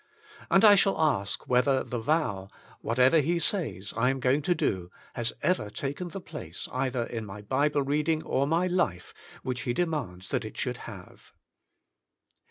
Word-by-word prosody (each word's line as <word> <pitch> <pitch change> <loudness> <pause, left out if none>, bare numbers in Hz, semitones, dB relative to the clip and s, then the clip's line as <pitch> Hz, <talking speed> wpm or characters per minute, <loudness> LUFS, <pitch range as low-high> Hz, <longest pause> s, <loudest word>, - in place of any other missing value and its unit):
And 195 +3 +5
I 210 - +10
shall 195 0 +3
ask 135 -11 0
whether 130 +2 +3
the 120 - -4
vow, 110 -8 0 0.3
Whatever 125 +7 +4
He 165 +4 +1
Says 165 - -1
I 120 +3 +2
Am 135 0 -1
Going 130 +3 +2
to 175 +4 +1
Do^ 95 - -1 0.2
has 120 -1 -1
ever 115 - +1
taken 140 - -4
the 195 - -6
place 85 - -8
either 130 -1 -1
in 115 -1 -5
my 105 0 -9
Bible 145 +5 +1
reading 150 +3 0
or 140 +1 0
my 165 +4 +2
life 175 - -1 0.3
which 125 -1 -3
He 120 - -1
demands 140 - -2
that - - -1
it - - -8
should - - -2
have. - - -12
135 Hz, 170 wpm, -28 LUFS, 115-160 Hz, 0.3 s, I